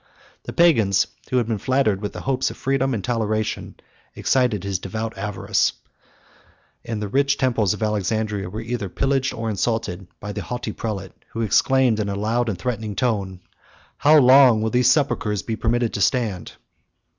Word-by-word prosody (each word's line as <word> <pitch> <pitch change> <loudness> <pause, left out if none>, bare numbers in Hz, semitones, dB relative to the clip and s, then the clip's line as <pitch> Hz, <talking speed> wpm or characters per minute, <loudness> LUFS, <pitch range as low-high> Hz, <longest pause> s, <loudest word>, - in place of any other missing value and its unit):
The - - -5
Pagans, 110 - +4 0.2
who 130 - +1
had 120 - +2
been 110 -2 -2
flattered 110 -5 +1
with 105 - -4
the - - -7
hopes 130 -1 0
of - - -10
freedom 135 -1 0
and 100 - -4
toleration, 110 -2 -2 0.4
excited 125 -7 +1
his 100 -2 -2
devout 110 +4 -5
avarice; 105 -2 0 1.1
and 115 -2 -4
the 105 - -3
rich 140 +6 +1
temples 115 -7 +1
of - - -5
Alexandria 105 -1 -1
were 110 +4 -6
either 115 -4 -4
pillaged 135 +5 0
or 115 0 -5
insulted 105 -3 -2
by 105 - -6
the - - -5
haughty 120 -3 -4
prince, 100 -4 -5 0.2
who 115 - -3
exclaimed, 115 +2 +3
in 105 -1 -1
a 100 - -2
loud 115 +4 0
and 100 - -3
threatening 110 0 -3
tone, 100 -5 -1 0.6
"How 150 +2 +5
long 130 -4 +6
will 110 - -1
these 125 0 +3
sepulchres 125 -8 +1
be 115 - -3
permitted 120 +1 0
to 100 - -3
stand?" 105 -5 0
110 Hz, 170 wpm, -22 LUFS, 105-125 Hz, 1.1 s, long